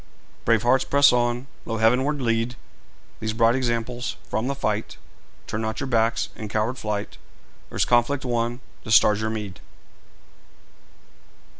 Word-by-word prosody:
Brave 115 -1 +3
hearts, 125 +2 +4
press 140 -1 +5
on! 120 +1 +1 0.2
Lo, 115 - -3
heavenward 130 +6 +2
lead 115 +1 0 0.6
These 110 0 -2
bright 115 +1 +4
examples! 120 -1 -2
From 110 +3 -2
the 140 - -1
fight 110 -5 -2 0.5
Turn 110 - -4
not 110 0 -3
your 140 - -2
backs 115 -3 +1
in 110 - -6
coward 110 +5 -1
flight; 105 -2 -4 0.5
Earth's - - 0
conflict 125 +3 +2
won, 120 0 -1 0.2
the - - -9
stars 105 -1 +5
your 110 - -1
meed! 105 -5 -5
115 Hz, 140 wpm, -24 LUFS, 110-125 Hz, 0.6 s, press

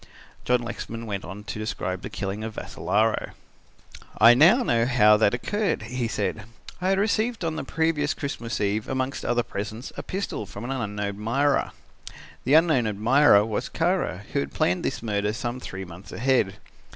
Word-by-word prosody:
John 125 -1 +2
Lexman 115 0 -6
went 100 -3 -4
on 95 +4 -8
to 105 +1 -6
describe 95 -3 -3
the - - -6
killing 100 +2 -4
of 110 -1 -5
Vassalaro. 110 +1 -1 0.8
"I 115 - +8
know 175 - +6
now 115 - +2
how 105 -4 +6
that 105 +1 +3
occurred," 205 - -1
he 125 -2 -2
said. 105 -1 -2 0.4
"I 185 - +1
had 195 - +3
received 220 0 0
on 160 -1 -1
the 160 - -3
previous 155 0 0
Christmas 120 -5 -4
eve 105 +1 0
amongst 130 +1 -2
other 120 0 +1
presents, 110 +5 -6
a - - -4
pistol 185 - -4
from 100 +3 -8
an 125 - -4
unknown 105 -5 -3
admirer. 115 +8 0 0.8
That 130 - 0
unknown 155 -6 +5
admirer 110 +1 +5
was 110 -2 -3
Kara, 170 - 0
who - - +2
had 70 0 -4
planned 90 +1 +1
this - - -3
murder 105 -1 0
some 120 +1 -4
three 95 -5 -7
months 90 +2 -12
ahead. 120 -6 +1
115 Hz, 175 wpm, -25 LUFS, 105-140 Hz, 0.8 s, I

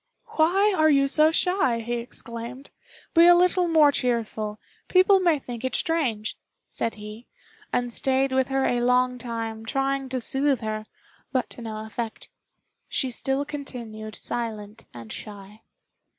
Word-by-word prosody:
"Why 390 +3 +3
are 315 -2 +4
you 275 -2 +4
so 305 +3 +4
shy?" 325 -10 +1
he 240 +1 -2
exclaimed; 235 +2 -8 0.4
"be 335 +1 +7
a 350 - +8
little 360 0 +3
more 315 -3 +5
cheerful 225 -5 -2 0.3
people 380 +1 +5
may 345 -4 +3
think 245 -3 -8
it 260 -1 -2
strange," 250 -10 -1 0.3
said 230 - -3
he, 210 +2 -10 0.4
and 245 -1 -1
stayed 265 +1 +1
with 260 0 +2
her 270 0 0
a 245 -1 +1
long 250 0 +2
time 225 -2 -5
trying 270 +2 -1
to 255 0 -2
soothe 270 +2 +2
her; 215 0 -4 0.4
but 255 -3 -1
to - - -10
no 220 -1 -6
effect 220 +1 -6 0.6
she 260 -2 0
still 270 +3 0
continued 235 -7 -7
silent 220 -2 -5
and 115 -2 -9
shy. 205 +1 -10
250 Hz, 150 wpm, -25 LUFS, 225-285 Hz, 0.6 s, a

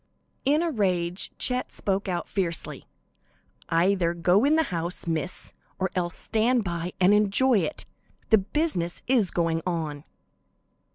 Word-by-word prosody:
In 295 +4 +3
a 335 - 0
rage 180 - 0
Chet 250 0 +1
spoke 195 0 -2
out 175 -2 -2
fiercely: 175 -5 -2 0.8
"Either 170 0 +2
go 180 +5 +3
in 295 +3 +4
the 320 - +3
house, 170 +1 -1
Miss, 165 +2 -3 0.2
or 190 -1 -1
else 175 -2 -1
stand 230 +2 +1
by 175 -1 -4
and 185 +2 +5
enjoy 210 +4 +3
it; 305 - -3 0.5
the 220 - +7
business 195 - -2
is 240 -7 +2
going 165 -1 0
on." 160 -5 -3
185 Hz, 135 wpm, -26 LUFS, 170-220 Hz, 0.8 s, the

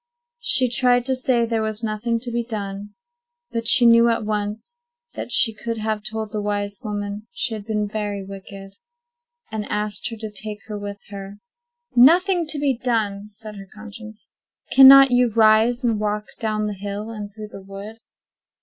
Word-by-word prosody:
She 260 - +3
tried 245 0 +2
to 260 0 +2
say 255 -2 +1
there 225 -1 -1
was 220 +1 -4
nothing 225 +2 -1
to 245 0 -2
be 235 0 -1
done; 205 -3 -6 0.6
but 230 -1 -3
she 245 - +7
knew 235 0 +6
at 230 -2 -1
once 210 - -4 0.3
that - - -6
she 225 - +4
could 230 +2 -5
have 215 -1 -2
told 215 0 -4
the 210 - -3
wise 205 -1 -3
woman 205 0 -5
she 240 -1 -2
had 210 -1 -7
been 210 -1 -1
very 205 -2 -4
wicked, 195 0 -10 0.8
and 220 -1 -3
asked 210 0 -2
her 230 - -8
to 215 -1 -7
take 210 0 -5
her 215 - -7
with 205 0 -6
her. 200 0 -9 0.6
Now 255 +6 +8
there - - +6
was 360 - -2
nothing 355 -4 0
to 305 - -1
be 285 -2 +1
done. - - -9
"Nothing - - -33
to - - -36
be - - -13 0.4
done!" 210 - -14
said 210 0 -9
her 195 -1 -10
conscience. 215 0 -11 0.4
"Cannot 270 0 +9
you 245 0 +4
rise, 225 +2 +3
and 230 -3 +1
walk 210 0 -2
down 215 -1 -1
the 210 0 -2
hill, 205 +2 -6
and 210 -2 -7
through 215 0 -9
the 195 - -10
wood?" 200 +3 -10
215 Hz, 200 wpm, -22 LUFS, 205-235 Hz, 0.8 s, Cannot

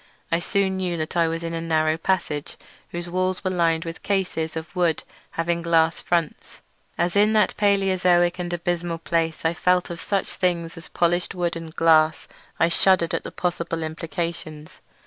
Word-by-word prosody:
I 165 - +3
soon 190 +1 0
knew 180 -2 -1
that 155 +1 -4
I 170 -1 +3
was 165 +1 -3
in 165 0 -3
a 165 - -2
narrow 155 -1 +1
passage 165 -4 -2 0.3
whose 175 0 -5
walls 185 +1 -1
were 185 - 0
lined 170 -2 +1
with 165 0 -7
cases 180 -5 -1
of 160 +4 -7
wood 170 -3 +1 0.3
having 170 0 0
glass 165 -1 +2
fronts. 170 -3 -2 0.3
As 175 +1 0
in 210 +2 +4
that 215 -1 +3
Palaeozoic 185 -3 +3
and 175 -1 -3
abysmal 175 0 -2
place 165 -1 -1
I 160 - +3
felt 180 0 +1
of 170 - -6
such 195 -2 -1
things 170 -3 -1
as 165 -1 -11
polished 175 +1 0
wood 175 -1 -1
and 165 -1 -8
glass 155 -1 +4 0.3
I 165 - +5
shuddered 170 0 +3
at - - -1
the - - -7
possible 170 -2 -2
implications. 160 -1 -5
170 Hz, 175 wpm, -24 LUFS, 165-180 Hz, 0.3 s, I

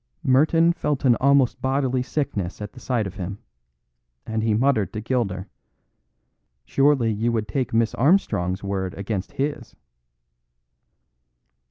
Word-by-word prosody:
Merton 160 +6 +4
felt 150 -5 -2
an 120 -2 +5
almost 140 -2 +3
bodily 130 -1 0
sickness 115 - -3
at 105 -1 -7
the 130 - -12
sight 120 -4 -1
of 95 0 -7
him; 95 +1 -5 0.9
and 110 0 -2
he 110 -1 +1
muttered 115 -5 +2
to 105 - -3
Gilder: 105 -5 -2 1.2
"Surely 135 - +2
you 115 +3 0
would 110 -2 -1
take 130 +5 -2
Miss 115 0 +1
Armstrong's 105 - +1
word 95 -1 -3
against 100 -1 -4
his?" 145 +2 -3
115 Hz, 130 wpm, -23 LUFS, 100-135 Hz, 1.2 s, an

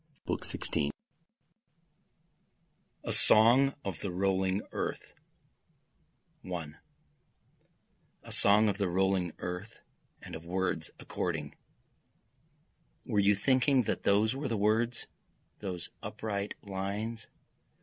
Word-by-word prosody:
BOOK - - -2
XVI 70 - +2 2.1
A - - -2
Song 125 +5 +6
of 95 -5 -4
the 100 - -3
Rolling 95 +1 0
Earth - - -4 1.3
1 80 -4 -6 1.4
A - - -11
song 105 +2 +5
of 100 0 -1
the 100 -3 +1
rolling 95 -1 +1
earth, 90 +6 -6 0.4
and - - -11
of 80 - -7
words 90 -2 -2
according, 80 -5 -4 1.5
Were 105 - 0
you 100 +1 +4
thinking 130 +4 +3
that - - -2
those 105 +4 +2
were 140 +1 -3
the 115 -3 -1
words, 110 +3 +1 0.5
those 90 -4 -5
upright 100 -2 -4
lines? 100 +3 -4
100 Hz, 100 wpm, -31 LUFS, 90-110 Hz, 2.1 s, Song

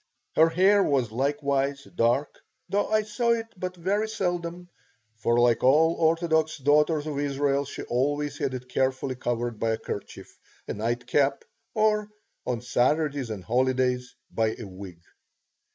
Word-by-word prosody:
Her 160 +1 +6
hair 190 +5 +4
was 130 -6 +1
likewise 140 +2 0
dark, 135 -1 0 0.3
though 205 +1 0
I 215 0 +2
saw 235 +3 +1
it 225 -1 -2
but 185 0 -5
very 200 +5 0
seldom, 175 -4 -3 0.5
for 120 +1 +1
like 120 -1 +3
all 155 +6 +5
orthodox 160 -1 +1
daughters 150 +2 +2
of 150 -2 -3
Israel 140 0 0
she - - -7
always 145 +4 -1
had 130 - -1
it 125 0 -7
carefully 130 +1 0
covered 120 -2 -3
by 115 0 +1
a - - -1
kerchief, 100 - -8 0.3
a - - -3
nightcap, 120 +5 0 0.3
or 215 -1 +2 0.4
on 120 -2 -1
Saturdays 135 +2 +1
and 105 -4 -5
holidays 125 +1 0 0.2
by 110 -1 0
a - - -7
wig. 95 -3 -10
140 Hz, 145 wpm, -26 LUFS, 120-165 Hz, 0.5 s, Her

